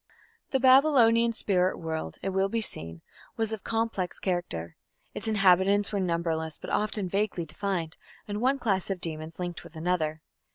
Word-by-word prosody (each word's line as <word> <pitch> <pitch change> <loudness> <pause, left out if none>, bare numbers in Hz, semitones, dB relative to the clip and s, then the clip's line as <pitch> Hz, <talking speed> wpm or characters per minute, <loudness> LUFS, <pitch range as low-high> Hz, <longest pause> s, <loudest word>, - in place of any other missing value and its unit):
The 265 - +1
Babylonian 255 -4 +5
spirit 185 -5 +1
world, 160 - -4
it 195 - 0
will 190 +1 +1
be 230 - 0
seen, 80 - -3 0.3
was 225 -1 0
of 220 - -6
complex 225 -5 -1
character. 85 - -2 0.4
Its - - -5
inhabitants 195 -1 +4
were 205 - -1
numberless, 165 -3 -1
but - - -8
often 210 -2 0
vaguely 195 -2 -1
defined, 170 -1 -3 0.3
and 205 +1 -3
one 265 +3 +3
class 200 -8 0
of 195 -2 -2
demons 160 -1 -6
linked 175 -1 -5
with 165 - -14
another. 160 -2 -1
190 Hz, 160 wpm, -28 LUFS, 165-220 Hz, 0.4 s, Babylonian